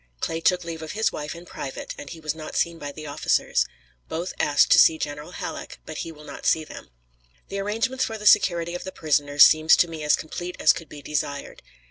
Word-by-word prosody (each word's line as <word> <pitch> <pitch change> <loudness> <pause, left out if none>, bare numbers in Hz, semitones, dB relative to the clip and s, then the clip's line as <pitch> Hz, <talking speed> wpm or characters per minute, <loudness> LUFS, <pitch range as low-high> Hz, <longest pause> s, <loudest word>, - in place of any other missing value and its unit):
Clay 165 - -2
took 180 +1 +2
leave 165 -1 -6
of 160 - -6
his 220 +1 +1
wife 150 +2 -5
in 170 +1 -11
private, 135 -5 -6
and 145 - -9
he 165 - -9
was 155 -2 -2
not 155 -1 -8
seen 170 -1 0
by 145 -2 -5
the 155 +1 -9
officers. 145 0 +1 0.4
Both 170 +3 -3
asked 145 -1 +3
to - - +8
see 160 - +6
General 150 -1 -5
Halleck, - - -6
but - - -7
he 165 - -5
will 150 -1 -14
not - - -6
see 160 - +3
them. - - -11 0.6
The 200 - -3
arrangements 225 +6 -1
for 225 - -5
the 210 - -9
security 170 -4 +4
of 175 - -5
the 190 - -6
prisoners 145 -3 +4
seem 155 0 +3
to 175 - +6
me 160 -2 -7
as 150 - +4
complete 175 +3 -6
as - - +6
could 165 - -9
be 145 -1 -11
desired. 140 0 -4
160 Hz, 225 wpm, -24 LUFS, 150-175 Hz, 0.6 s, to